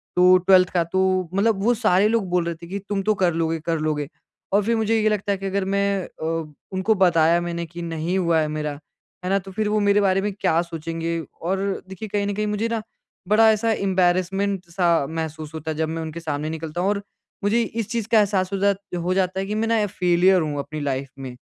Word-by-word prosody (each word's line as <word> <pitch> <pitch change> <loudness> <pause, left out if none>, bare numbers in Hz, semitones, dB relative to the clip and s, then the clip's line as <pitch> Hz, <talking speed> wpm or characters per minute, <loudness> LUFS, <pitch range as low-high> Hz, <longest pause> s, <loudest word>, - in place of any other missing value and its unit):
तो 180 +1 +7
12th 185 -1 +6
का 175 -2 +3
तो 185 +1 0
मतलब 200 0 +1
वो 240 +3 +4
सारे 210 -4 +3
लोग 220 -4 0
बोल 175 -1 +1
रहे 170 -1 -2
थे 170 - -9
कि 195 +3 -4
तुम 200 -1 0
तो 215 - +3
कर 175 -2 +3
लोगे, 165 0 -1
कर 165 +1 -2
लोगे। 150 -2 -1 0.5
और 205 - +4
फ़िर 230 +3 +1
मुझे 220 +1 +1
ये 215 - +3
लगता 205 -1 -1
है 195 - 0
कि 195 - -7
अगर 195 0 -1
मैं 200 -1 0
अ, 160 -1 -4 0.2
उनको 190 +4 +2
बताया 170 -3 +4
मैंने 170 0 -3
कि 170 +2 -9
नहीं 165 +2 -2
हुआ 170 -3 +2
है 155 - +1
मेरा। 150 -1 -3 0.5
है - - -1
ना? 195 +1 +3
तो 195 0 -11
फ़िर 210 +3 -1
वो 215 0 +2
मेरे 205 0 +3
बारे 195 -1 +2
में 205 0 -1
क्या 180 -4 +1
सोचेंगे 165 0 -4 0.2
और 190 +3 -1 0.3
देखिए 190 +3 -7
कहीं 205 0 0
न 205 - -1
कहीं 210 +1 -1
मुझे 210 +2 -1
ना 225 -1 -1 0.5
बड़ा 220 +2 +6
ऐसा 225 +1 +1
एंबेरेसमेंट 190 0 +1
सा 170 -4 +2
महसूस 160 -1 -5
होता 160 0 -4
है 155 - -5
जब 160 -1 0
मैं 165 0 -3
उनके 160 +1 -6
सामने 155 -2 -3
निकलता 160 +1 -4
हूँ 195 - +1
और 205 -1 0 0.4
मुझे 220 +4 +2
इस 225 -1 -4
चीज़ 230 -3 -2
का 225 - +6
एहसास 195 -2 +1
हो - - 0
जात 200 0 +2 0.3
हो 180 +1 +1
जाता 190 0 0
है 195 - -2
कि 210 +2 -3
मैं 225 +1 0
ना 225 -1 +2
अ, - - +2
फ़ेलीयर 180 0 +3
हूँ 150 -2 -2
अपनी 155 +2 -5
लाइफ़ 135 -1 -2
में। 130 -2 -7
185 Hz, 240 wpm, -23 LUFS, 165-200 Hz, 0.5 s, तो